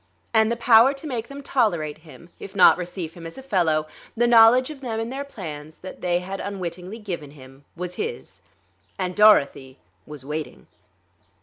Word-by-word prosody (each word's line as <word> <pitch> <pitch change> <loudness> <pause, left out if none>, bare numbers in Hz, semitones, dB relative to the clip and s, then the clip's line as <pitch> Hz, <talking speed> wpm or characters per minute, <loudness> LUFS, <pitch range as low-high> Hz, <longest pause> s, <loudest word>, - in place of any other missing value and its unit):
And 220 0 +3
the - - 0
power 235 +3 +5
to 275 - -10
make 240 -6 -4
them 280 +2 -10
tolerate 170 - 0
him, 170 +2 -16
if 195 - -10
not 185 - +7
receive 175 -2 -6
him 170 -1 -9
as 165 - -12
a 265 - -9
fellow, 170 - +1 0.3
the 240 - +3
knowledge 240 +3 +6
of 285 -3 -11
them 230 -4 -3
and 225 +3 -4
their 275 +1 -4
plans 155 - -9
that 185 - -11
they 175 0 0
had 190 +2 -6
unwittingly 185 0 -6
given 180 -9 -6
him, 135 -1 -16
was 180 +1 -6
his. 465 +2 -7 0.6
And 185 -2 -3
Dorothy, 140 -11 +4 0.3
was 145 -3 -9
waiting.... 150 - -6
185 Hz, 180 wpm, -23 LUFS, 160-230 Hz, 0.6 s, not